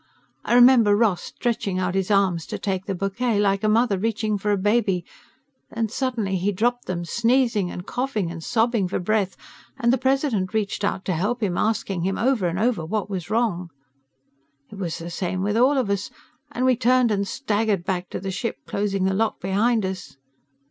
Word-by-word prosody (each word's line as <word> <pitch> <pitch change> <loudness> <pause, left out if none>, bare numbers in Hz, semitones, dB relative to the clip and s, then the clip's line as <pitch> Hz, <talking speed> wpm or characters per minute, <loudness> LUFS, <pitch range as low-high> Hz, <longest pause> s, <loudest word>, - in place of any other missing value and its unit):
I 240 - +1
remember 245 -4 +7
Ross 205 -5 +2
stretching 215 -6 -2
out 180 -1 -1
his 190 0 -1
arms 190 -5 +2
to - - -4
take 190 -2 -2
the 195 - -1
bouquet, 200 +4 -1
like 195 -1 +1
a 215 - +3
mother 215 -2 +2
reaching 215 0 -1
for 210 - -2
a 205 - +3
baby. 200 -3 +1 0.6
Then 225 -1 -2
suddenly 230 -6 -1
he 190 +3 0
dropped 240 +5 0
them, 175 -2 -3
sneezing 235 -2 +1
and 180 - -7
coughing 230 -9 -2
and 165 -1 -8
sobbing 225 -3 +1
for 180 - -2
breath, 195 0 0 0.4
and 235 +1 +2
the 260 - +1
President 260 -8 0
reached 205 -1 -1
out 195 -1 -1
to 185 - 0
help 215 +8 -1
him, 185 -4 0
asking 200 -4 -1
him 190 +2 -1
over 240 -6 +1
and 170 +1 -2
over 220 -4 +1
what 205 +4 -3
was 180 -2 -4
wrong. 210 -6 0 1.0
"It 205 - -9
was 170 -4 -3
the 170 +1 -7
same 185 +1 -2
with 205 +1 0
all 260 +5 +4
of 255 -5 +1
us, 200 0 -1 0.4
and 255 - -1
we 255 -1 +4
turned 250 0 +3
and 200 -1 0
staggered 210 -5 0
back 180 -1 -2
to - - -4
the 190 +1 -4
ship, 195 +5 -3
closing 200 -1 -1
the 190 0 +2
lock 220 +3 0
behind 210 +3 +1
us. 185 -6 -6
205 Hz, 195 wpm, -23 LUFS, 185-230 Hz, 1.0 s, remember